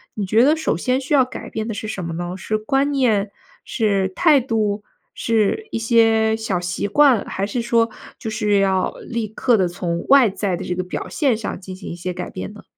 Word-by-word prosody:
你 205 - -2
觉 220 +5 +4
得 300 +3 +5
首 315 - -1
先 255 +8 0
需 290 +3 -3
要 260 - +5
改 255 - -8
变 220 +1 -4
的 225 - -3
是 215 +1 -5
什 190 -5 -4
么 165 - -4
呢？ 175 +2 -4
是 215 +2 -2
观 270 +6 +1
念、 220 -7 +1 0.3
是 200 -5 +1
态 305 -5 +5
度、 215 -4 -1 0.3
是 230 - 0
一 230 - -2
些 225 -1 +3
小 205 -5 -2
习 180 +3 -3
惯， 265 -1 +4
还 195 +1 -3
是 235 +4 -3
说 230 -1 +2 0.3
就 220 - -5
是 210 -2 +1
要 190 -1 +1 0.2
立 230 -3 -2
刻 225 +2 +1
地 185 -2 +2
从 170 -1 -3
外 270 -5 +7
在 190 -1 -2
的 - - -6
这 180 - -3
个 185 - -2
表 180 - -5
现 270 -7 +1
上 215 -4 -5
进 185 0 -9
行 190 - -9
一 170 - -5
些 180 +1 -4
改 180 0 -6
变 95 0 -7
呢？ - - -13
215 Hz, 240 characters per minute, -21 LUFS, 190-235 Hz, 0.3 s, 外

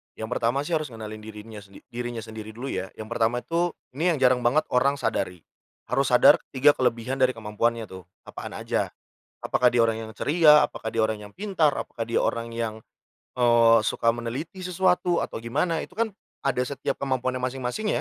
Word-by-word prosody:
Yang 110 0 -6
pertama 125 +3 0
sih, 150 - -7
harus 155 -1 -4
ngenalin 110 -1 -7
dirinya 105 0 -10
se 100 -1 -16 0.2
dirinya 120 -1 -4
sendiri 110 0 -9
dulu 130 +4 -5
ya. 95 0 -3
Yang 110 0 -8
pertama 120 +1 0
itu, 170 +1 0 0.2
ini 165 +7 +1
yang - - -2
jarang 130 -1 +5
banget 145 +6 +4
orang 135 +3 +3
sadari, 90 - -2 0.5
harus - - +1
sadar - - +7
3 135 +3 +6
kelebihan 125 0 -1
dari 130 -1 +3
kemampuannya 115 +1 -1
tuh, 95 -2 -11 0.2
apaan - - -8
aja. - - -2 0.5
Apakah 125 -1 +2
dia 120 - +3
orang 115 -1 +3
yang 110 - -9
ceria, 150 +5 +5
apakah 110 - -7
dia 115 - 0
orang 110 0 +1
yang 105 - -12
pintar, 185 -7 +1
apakah 115 - -4
dia 115 +1 0
orang 115 0 -1
yang, 110 -1 -4 0.6
eee, 120 -1 +6
suka 115 +1 +2
meneliti 120 +10 -5
sesuatu 180 -1 +1
atau - - -5
gimana. 150 +9 -1
Itu 180 - -8
kan 225 0 0 0.3
ada 135 -2 0
setiap 135 +2 -3
kemampuannya 130 -1 -1
masing-masing 130 +10 -3
120 Hz, 185 wpm, -25 LUFS, 115-145 Hz, 0.6 s, sadar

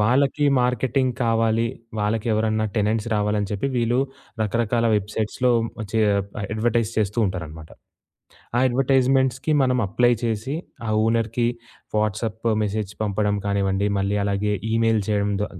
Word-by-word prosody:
వాళ్ళకి 135 +6 +2
మార్కెటింగ్ 125 +1 +1
కావాలి, 115 -1 +2 0.3
వాళ్ళకి 105 +2 -1
ఎవరన్నా 110 0 +1
టెనెంట్స్ 105 +1 +1
రావాలని 105 -1 0
చెప్పి, 105 +5 -1
వీళ్ళు 120 +1 +1 0.4
రకరకాల 115 +2 +1
వెబ్‌సైట్స్‌లో 105 +4 0 0.4
చే 110 - 0 0.4
ఆహ్, 100 - -4
అడ్వర్టైజ్ 115 0 +1
చేస్తూ 105 +1 0
ఉంటారన్నమాట. 80 -4 -6 0.9
ఆ - - +3
అడ్వర్టైజ్‌మెంట్స్‌కి 130 +2 +2
మనం 130 -1 +2
అప్లై 120 +4 +3
చేసి, 115 +4 -2 0.3
ఆ - - -1 0.2
ఓనర్‌కి 115 +1 +1 0.5
వాట్సాప్ 110 +1 -1 0.2
మెసేజ్ 105 -1 -2
పంపడం 105 0 0
కానివ్వండి, 100 0 +1
మళ్ళీ 100 +1 0
అలాగే 100 +1 0 0.2
ఈమెయిల్ 115 -1 +2
చేయడం 105 -1 +1
ద - - +1
110 Hz, 125 wpm, -23 LUFS, 105-120 Hz, 0.9 s, ఆ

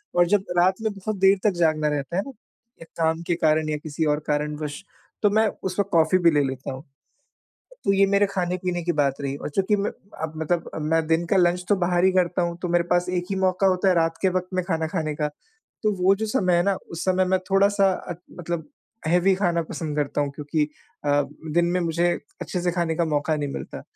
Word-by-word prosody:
और 175 0 +5
जब 200 +1 +2
रात 185 +4 +3
में 220 -1 0
बहुत 200 +2 -4
देर 195 +1 +5
तक 210 - +4
जागना 155 -2 +2
रहता 145 +2 -3
है - - +3
ना 275 - -7 0.5
ये - - -9
काम 160 0 +1
के 175 - +2
कारण 155 -1 +2
या 150 - -1
किसी 155 +1 -2
और 150 -1 +2
कारणवश 150 +1 -2 0.4
तो 210 - +4
मैं 220 +2 +3 0.2
उस 185 +1 -3
वक़्त 200 -1 +1
कॉफ़ी 165 +1 +4
भी 170 -2 +5
ले 145 -1 +3
लेता 135 0 -4
हूँ। 130 +1 -9 1.0
तो 195 - +3
ये 195 0 +4
मेरे 200 +1 +3
खाने-पीने 180 -1 -2
की 175 - +1
बात 145 -3 +1
रही 140 -1 -3
और - - -5
चूँकि 195 +7 +1
मैं 200 +1 -1
अ, 160 -5 -8
मतलब 165 +2 -1
मैं 160 +1 +1
दिन 165 +2 +2
का 195 - +2
लंच 180 0 +2
तो 205 - +4
बाहर 175 -1 +1
ही 190 - +5
करता 180 -1 +1
हूँ। 170 0 -2
तो 180 - -1
मेरे 175 0 +2
पास 180 0 +2
एक 180 -1 -1
ही 195 - -1
मौका 185 +1 +2
होता 185 +1 +2
है 185 - +4
रात 165 -1 +1
के 190 - +4
वक़्त 180 0 -2
में 185 - +1
खाना 165 -3 -1
खाने 155 -3 -2
का। 150 0 -1 0.6
तो 215 - +3
वो 190 +2 +6
जो 220 +2 -2
समय 190 -6 +2
है 175 - +3
ना 200 0 +2 0.2
उस 170 - -4
समय 185 0 +3
मैं 190 +1 +2
थोड़ा-सा 195 0 +4
अ, 180 -1 -5 0.2
मतलब 170 -1 -4 0.4
हेवी 180 +3 +4
खाना 175 -3 +1
पसंद 155 -3 -4
करता 145 0 0
हूँ। 145 -1 0
क्योंकि 150 +1 0 0.4
अ, 145 0 +3 0.3
दिन 175 0 +4
में 180 +1 0
मुझे 170 +1 +1 0.3
अच्छे 180 - -3
से 180 - +1
खाने 170 -2 0
का 170 - +2
मौका 155 0 0
नहीं 145 -2 -3
मिलता। - - -7
175 Hz, 235 wpm, -24 LUFS, 155-190 Hz, 1.0 s, वो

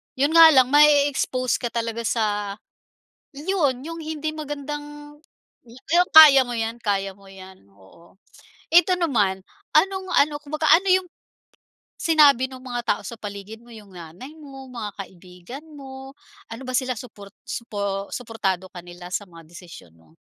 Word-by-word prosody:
'Yon 285 +3 +1
nga 330 0 +9
lang 260 -1 +4
mae-expose 285 -4 +3
ka 240 - -3
talaga 230 -1 -4
sa 205 -3 -2 0.8
'yon 290 -5 -1
'yong 330 +1 -7
hindi 310 0 -4
magandang 295 0 -8 0.5
'yan 315 +9 0
kaya 300 -4 +10
mo 245 - -5
'yan, 225 0 -3
kaya 195 -2 -1
mo 195 -1 -19
'yan, 190 - -14
oo. 100 - -21 0.6
Eto 355 +2 +5
naman, 210 - 0 0.3
anong 380 -1 +2
ano, 290 +1 +2
kumbaga 305 +2 -2
ano 340 +5 +5
'yong 370 -1 +2 0.9
sinabi 290 -6 +4
no'ng 260 -1 -11
mga 245 -1 -4
tao - - -12
sa 235 - -8
paligid 205 +1 -9
mo, - - -20
'yong 210 -3 -14
nanay 175 - -11
mo, 270 -3 -12
mga 225 -4 -6
kaibigan 185 - -13
mo? 270 -1 -11 0.4
Ano 225 +3 -8
ba - - -3
sila 255 -1 -1
suport 205 -4 -12
supo 200 -3 -5
suportado 200 -6 -3
ka 180 - -9
nila 175 0 -11
sa 205 - -3
mga 165 -2 -15
desisyon 170 - -13
mo? 80 0 -26
250 Hz, 150 wpm, -22 LUFS, 200-295 Hz, 0.9 s, kaya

